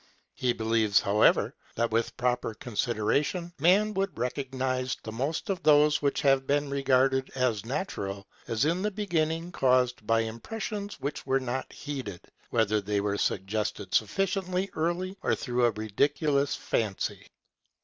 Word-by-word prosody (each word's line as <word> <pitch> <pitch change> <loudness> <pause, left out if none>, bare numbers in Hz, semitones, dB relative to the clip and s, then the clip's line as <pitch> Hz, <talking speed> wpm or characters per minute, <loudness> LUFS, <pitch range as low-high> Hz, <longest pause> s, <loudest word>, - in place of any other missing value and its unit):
He 125 -1 0
believes, 110 -3 +2
however, 105 +2 +3 0.2
that 115 0 0
with 115 +1 0
proper 125 -2 0
consideration 120 - -1
man 195 +7 +4
would 195 0 -2
recognize 130 0 -2
the 110 - -6
most 135 +8 -2
of 185 - -3
those 150 0 +5
which 140 -1 +1
have 135 -1 +3
been 145 0 +1
regarded 135 -1 +2
as 125 -6 +1
natural, 100 - -3 0.2
as 115 +4 +1
in 170 +4 +1
the 210 - +1
beginning 170 -5 -1
caused 125 -6 +2
by 115 0 +3
impressions 200 - -5
which 140 0 -4
were 135 0 +3
not 130 0 -4
heeded, 130 - -6 0.3
whether 110 -2 +2
they 100 0 -1
were 100 0 -1
suggested 100 0 -2
sufficiently 185 - 0
early 175 +4 -1
or - - +1
through 125 -2 0
a - - +1
ridiculous 140 +7 +1
fancy. 105 -4 -2
130 Hz, 140 wpm, -28 LUFS, 115-155 Hz, 0.3 s, those